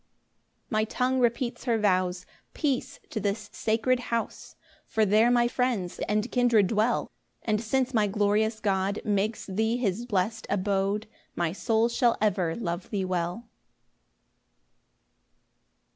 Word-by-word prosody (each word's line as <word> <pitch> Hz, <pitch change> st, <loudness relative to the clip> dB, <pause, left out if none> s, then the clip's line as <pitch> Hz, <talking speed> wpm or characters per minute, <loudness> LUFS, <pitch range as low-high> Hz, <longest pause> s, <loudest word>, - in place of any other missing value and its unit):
5 -, -, -41 dB
My 215 Hz, -1 st, +2 dB
tongue 255 Hz, +4 st, 0 dB
repeats 240 Hz, +1 st, 0 dB
her 235 Hz, -3 st, +2 dB
vows 185 Hz, -3 st, +1 dB, 0.3 s
"Peace 280 Hz, -5 st, -1 dB
to 220 Hz, -, -2 dB
this 205 Hz, +1 st, -3 dB
sacred 230 Hz, +3 st, +1 dB
house!" 230 Hz, -1 st, -3 dB, 0.3 s
For 220 Hz, -1 st, +2 dB
there 215 Hz, +4 st, +4 dB
my 240 Hz, -1 st, +4 dB
friends 240 Hz, -8 st, -1 dB
and 210 Hz, +3 st, 0 dB
kindred 240 Hz, -5 st, +4 dB
dwell; 220 Hz, +5 st, 0 dB, 0.3 s
And 215 Hz, -1 st, 0 dB
since 260 Hz, +3 st, 0 dB
my 215 Hz, -3 st, +3 dB
glorious 210 Hz, +2 st, +1 dB
God 195 Hz, -1 st, 0 dB
Makes 210 Hz, +1 st, 0 dB
thee 220 Hz, +4 st, 0 dB
his 235 Hz, 0 st, -1 dB
blest 215 Hz, +1 st, -1 dB
abode, 200 Hz, +1 st, 0 dB, 0.3 s
My 170 Hz, -2 st, 0 dB
soul 225 Hz, +4 st, +1 dB
shall 235 Hz, 0 st, +2 dB
ever 190 Hz, -6 st, +1 dB
love 175 Hz, -5 st, -4 dB
thee 195 Hz, -3 st, -1 dB
well. 180 Hz, +5 st, -2 dB
215 Hz, 130 wpm, -27 LUFS, 195-235 Hz, 0.3 s, there